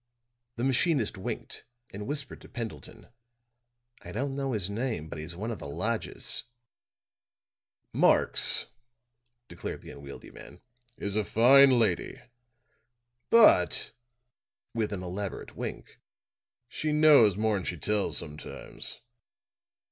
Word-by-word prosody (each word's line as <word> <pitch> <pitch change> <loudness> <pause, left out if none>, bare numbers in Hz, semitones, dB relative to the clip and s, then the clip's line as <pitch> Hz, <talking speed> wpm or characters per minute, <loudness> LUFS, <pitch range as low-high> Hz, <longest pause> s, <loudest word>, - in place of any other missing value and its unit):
The 120 - -4
machinist 135 - +1
winked 100 +5 -6 0.3
and 105 +1 -6
whispered 145 -2 -5
to - - -14
Pendleton: 115 -1 -8 0.9
"I - - -9
don't 135 +4 -2
know 135 -2 -2
his 100 -5 0
name, 110 -5 -3
but 80 - -7
he's 80 +3 -6
one 110 +6 -4
of 110 - -5
the - - -7
lodgers." 70 - -1 1.5
"Marx," - - +3 0.8
declared 85 - -7
the - - -10
unwieldy 70 0 -11
man, - - -13 0.4
"is 100 0 -4
a 110 - +1
fine 130 +6 +6
lady. 105 -7 0 1.1
But," 150 - +5 0.8
with 110 -3 -1
an 95 -3 -4
elaborate 95 +2 -5
wink, - - -7 0.7
"she 155 +5 -3
knows 150 - +6
more'n 105 -3 +1
she 90 - -3
tells 105 +3 0
sometimes." 75 -1 -7
110 Hz, 115 wpm, -29 LUFS, 90-130 Hz, 1.5 s, fine